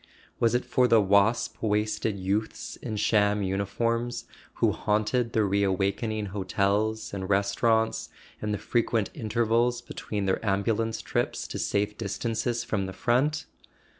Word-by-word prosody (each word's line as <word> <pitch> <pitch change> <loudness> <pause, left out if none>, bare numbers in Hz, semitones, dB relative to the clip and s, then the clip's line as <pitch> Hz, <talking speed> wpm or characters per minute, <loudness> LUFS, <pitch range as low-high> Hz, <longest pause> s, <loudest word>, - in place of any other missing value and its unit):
Was 115 0 +3
it 125 - 0
for 125 -1 +3
the 115 -2 +6
wasp 100 +3 +2
waisted 105 0 0
youths 100 +3 -2
in 110 -3 -5
sham 105 -1 +2
uniforms 115 +5 -1 0.3
who - - +3
haunted 110 +3 0
the 110 - +3
reawakening 100 +2 0
hotels 100 +3 0
and 95 -1 -4
restaurants, 105 +3 +1 0.3
in 105 - -2
the 105 - 0
frequent 115 0 0
intervals 115 +2 +1
between 105 -4 -4
their 95 +2 0
ambulance 110 +2 0
trips - - -1
to - - -4
safe 105 +1 -1
dis¬ 100 -3 -3
tances 120 +1 -1
from 100 -5 -1
the 95 - -6
front? 130 +10 +1
105 Hz, 135 wpm, -27 LUFS, 100-115 Hz, 0.3 s, the